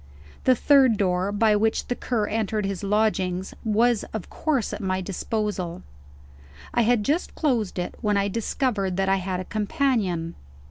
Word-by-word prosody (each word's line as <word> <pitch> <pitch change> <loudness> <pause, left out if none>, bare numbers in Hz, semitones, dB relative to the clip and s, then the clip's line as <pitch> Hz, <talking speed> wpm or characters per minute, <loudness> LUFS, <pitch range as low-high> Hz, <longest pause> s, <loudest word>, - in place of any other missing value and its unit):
The 255 - +6
third 265 -3 +5
door, 185 0 +1
by 210 +1 +3
which 220 +1 +1
the - - -1
Cur 230 -4 -1
entered 215 -1 -1
his 195 -2 -3
lodgings, 195 -3 0
was 225 +1 +2
of 220 - -6
course 280 -8 -1
at - - -5
my 185 -1 -1
disposal. 190 -1 -3 0.9
I - - +3
had 230 -1 +3
just 305 - -1
closed 240 - 0
it, 180 - -3
when 210 -3 +1
I 200 0 +2
discovered 205 -3 -1
that 195 0 +1
I 195 - +3
had 185 -1 -3
a 185 - -5
companion. 210 - 0
210 Hz, 165 wpm, -25 LUFS, 190-230 Hz, 0.9 s, The